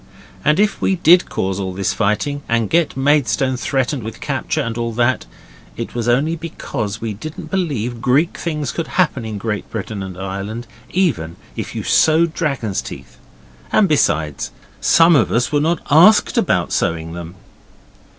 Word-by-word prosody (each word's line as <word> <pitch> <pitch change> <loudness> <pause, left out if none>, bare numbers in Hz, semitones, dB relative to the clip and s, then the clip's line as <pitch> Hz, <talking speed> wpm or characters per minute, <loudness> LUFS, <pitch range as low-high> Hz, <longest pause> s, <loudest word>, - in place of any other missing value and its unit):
And 150 +4 +3
if 210 +1 +1
we 190 - +2
did 175 0 +5
cause 95 +1 -2
all 95 -1 -3
this 95 0 0
fighting, 115 +7 0
and 115 -2 +1
get 165 -4 +2
Maidstone 135 -1 +2
threatened 130 +1 -1
with 110 0 -7
capture 150 +2 -2
and 115 -4 -3
all 115 0 -2
that, 120 +2 +1 0.5
it - - -5
was 120 -1 -2
only 140 +7 +2
because 115 -10 -5
we 110 -2 -3
didn't 155 +10 -8
believe 125 - -2
Greek 140 +9 +2
things 150 -4 -3
could 165 -2 -4
happen 150 -10 +2
in 110 -2 -4
Great 105 0 -3
Britain 105 -1 -5
and 95 -2 -7
Ireland, 100 +5 -5 0.2
even 95 - 0 0.2
if - - -5
you - - -3
sow 160 +1 +4
dragon's 140 - -2
teeth, - - -10 0.5
and 205 - +4
besides, 80 - +1 0.3
some 165 0 +5
of 135 - +3
us 120 +2 +1
were 145 -1 +2
not 160 +1 +1
asked 180 +9 +6
about - - +1
sowing 80 0 -1
them. 85 +1 -8
125 Hz, 165 wpm, -19 LUFS, 105-155 Hz, 0.5 s, asked